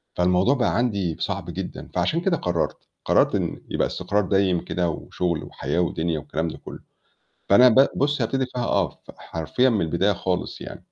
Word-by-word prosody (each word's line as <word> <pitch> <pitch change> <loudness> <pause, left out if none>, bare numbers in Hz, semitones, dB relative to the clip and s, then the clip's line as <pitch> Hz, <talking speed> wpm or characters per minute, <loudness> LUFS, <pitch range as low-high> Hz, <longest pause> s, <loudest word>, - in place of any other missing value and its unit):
فالموضوع 90 +8 +3
بقى 120 - +1
عندي 100 -9 0
صعب - - -3
جدًا، - - -6
فعشان 165 +2 +1
كده 175 -2 +1
قرّرت، 85 - -1 0.3
قرّرت - - +3
إن - - -2
يبقى - - +1
استقرار 105 -1 -1
دايم 95 -2 +2
كده 90 -1 -1
وشُغل 85 +1 -3
وحياة 85 - -3
ودنيا 85 -2 0
والكلام 80 +2 -3
ده 80 - -6
كلّه. - - -10 0.7
فأنا 125 +6 +8
ب 130 +4 +6
بُصّي 145 -3 +1
هابتدي 135 +3 0
فيها 125 -1 -4
آه، 95 -8 +1
ف - - -16
حرفيًا 85 +11 0
من 110 -6 +1
البداية 85 +5 +1
خالص 90 0 -3
يعني. - - -9
95 Hz, 175 wpm, -24 LUFS, 85-125 Hz, 0.7 s, فأنا